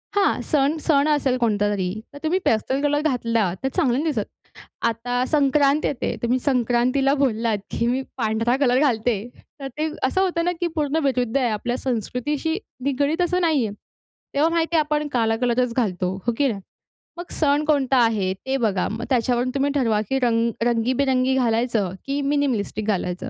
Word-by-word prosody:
हां. 400 -1 +2
सण 290 0 +2
सण 295 -2 +2
असेल 280 -4 +1
कोणता 210 -4 +1
तरी, 190 -3 -1 0.2
तर - - -9
तुम्ही 335 +4 +1
पेस्टल 260 +5 +1
कलर 290 0 +1
घातला, 230 - 0
तर - - +1
चांगलं 265 -9 +2
नाही 315 +1 0
दिसत. 215 -5 -2 0.6
आता 245 +2 -1
संक्रांत 285 0 +3
येते, 270 - -2
तुम्ही 245 +2 +1
संक्रांतीला 255 +1 +1
बोललात, 230 -4 +1
की 235 - 0
मी 255 +2 +1 0.2
पांढरा 225 +1 +1
कलर 255 -2 +3
घालते. 245 -5 +1 0.4
तर 275 - -5
ते 310 +1 0
असं 265 +8 +2
होतं 345 -3 0
ना, 355 - +2
की 350 - 0
पूर्ण 300 -1 0
विरुद्ध 250 -3 +1
आहे 255 -3 +1
आपल्या 240 +3 -2
संस्कृतीशी 265 - -2 0.3
निगडित, 285 +4 0
असं 360 +1 +1
नाही 310 -8 +2
आहे. 205 - -4 0.6
तेव्हा 295 +3 +3
माहिती 335 0 0
आहे, - - +5
आपण 300 0 -1
काळा 225 -2 +2
कलरच 245 0 +1
घालतो, 185 -6 0
हो 240 - +2
की 285 - +3
नाही? 210 -6 -3 0.6
मग 345 0 -8
सण 290 -1 +1
कोणता 275 -3 +2
आहे 205 -5 +1
ते 265 +8 -4
बघा, 210 -7 0
मग 225 +2 -5
त्याच्यावरून 245 -1 +1
तुम्ही 280 +1 +1
ठरवा, 225 -6 +2
की 270 - +1
रंग 235 -2 +2 0.2
रंगीबेरंगी 255 +2 +1
घालायचं, 230 -5 +1
की 280 +1 -2
मिनिमलिस्टिक 265 -7 -1
घालायचं. 190 +3 -2
255 Hz, 175 wpm, -22 LUFS, 230-285 Hz, 0.6 s, आहे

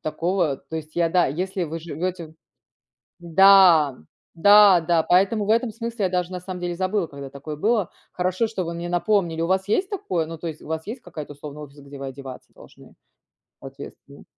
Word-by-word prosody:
такого. 170 -1 -1
То 140 +4 -8
есть 155 0 -8
я, 170 -1 +2
да, 175 +1 +3
если 180 +5 -3
вы 165 +1 -6
живете 170 +2 -5
в 155 - -19 0.9
Да! 175 -5 +6 0.4
Да, 200 +1 +7
да, 165 0 +2
поэтому 195 +5 +2
в - - -1
этом 230 +1 +2
смысле 230 -1 -4
я - - +2
даже, 180 -1 -1
на 180 - -5
самом 180 0 -7
деле, 175 -1 -3
забыла, 185 -1 -1
когда 140 -1 -9
такое 140 +3 -8
было. 210 +3 0 0.2
Хорошо, 185 +5 0
что 220 -4 -4
вы 170 -1 -4
мне 170 +1 -5
напомнили. 175 -2 0
У 165 - -1
вас 190 0 +1
есть 370 - 0
такое, 185 - -2
ну, 165 0 -8
то 170 - -7
есть 160 -2 -6
у - - -13
вас 160 0 -4
есть 235 +5 -6
какая-то, 155 -7 -9
условно, 145 +1 -10
офис, 145 0 -13
где 140 0 -12
вы 135 - -6
одеваться 135 -1 -10
должны - - -17 0.7
соответственно? 140 +1 -12
175 Hz, 200 wpm, -23 LUFS, 155-190 Hz, 0.9 s, Да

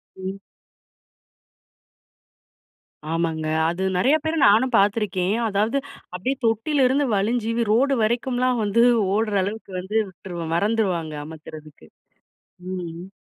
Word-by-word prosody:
ம். 190 +1 -6 2.7
ஆமாங்க. 165 -2 -1 0.2
அது 175 +3 -3
நெறையா 270 +11 +4
பேர 315 +1 0
நானும் 230 +5 +4
பார்த்துருக்கேன். 200 -1 +1
அதாவது, 215 +7 0 0.4
அப்டியே 255 +10 -1
தொட்டிலருந்து 265 +4 +2
வழிஞ்சி, 225 +3 0 0.2
ரோடு 270 +5 +3
வரைக்கும்லாம் 245 +1 0
வந்து 210 +3 +3 0.3
ஓடுற 215 -1 0
அளவுக்கு 205 0 -6
வந்து, 190 +4 -6
விட்டுருவோம். 175 -3 -6
மறந்திருவாங்க, 185 -5 0
அமத்துறதுக்கு. 155 - -12 0.8
ம் 185 -1 -4
ம். 175 +3 -10
205 Hz, 100 wpm, -23 LUFS, 180-235 Hz, 2.7 s, நெறையா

